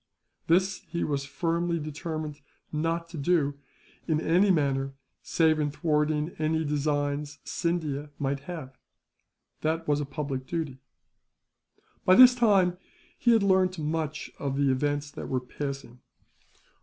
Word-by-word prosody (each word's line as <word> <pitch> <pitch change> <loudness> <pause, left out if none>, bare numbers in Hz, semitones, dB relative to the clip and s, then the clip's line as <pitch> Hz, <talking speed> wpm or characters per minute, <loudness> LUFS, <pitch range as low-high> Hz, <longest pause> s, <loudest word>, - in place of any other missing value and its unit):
This 185 +4 +3
he 170 - -2
was 140 -2 -1
firmly 170 +3 -1
determined 155 -1 -5 0.3
not 165 +2 -1
to 170 -3 -7
do, 145 -2 +1 0.5
in 155 -2 +2
any 180 +6 +3
matter 135 -5 +1 0.3
save 160 -2 +2
in 150 -1 +1
thwarting 150 +1 0
any 160 +1 +1
designs 145 0 -1
Scindia 155 -4 -2
might 140 0 -1
have. 145 -7 -6 0.9
That 160 +1 -1
was 145 -1 +2
a - - -2
public 140 -2 -4
duty. 155 -6 -3 1.2
By 185 - +6
this 250 +2 +10
time, 195 -7 +3 0.4
he 240 - +3
had 225 -3 +4
learnt 185 -1 +3
much 155 -1 -3
of 140 -1 -2
the 140 -1 +3
events 145 +2 -1
that - - -7
were 130 - +1
passing. 135 -1 -6
155 Hz, 130 wpm, -28 LUFS, 145-170 Hz, 1.2 s, this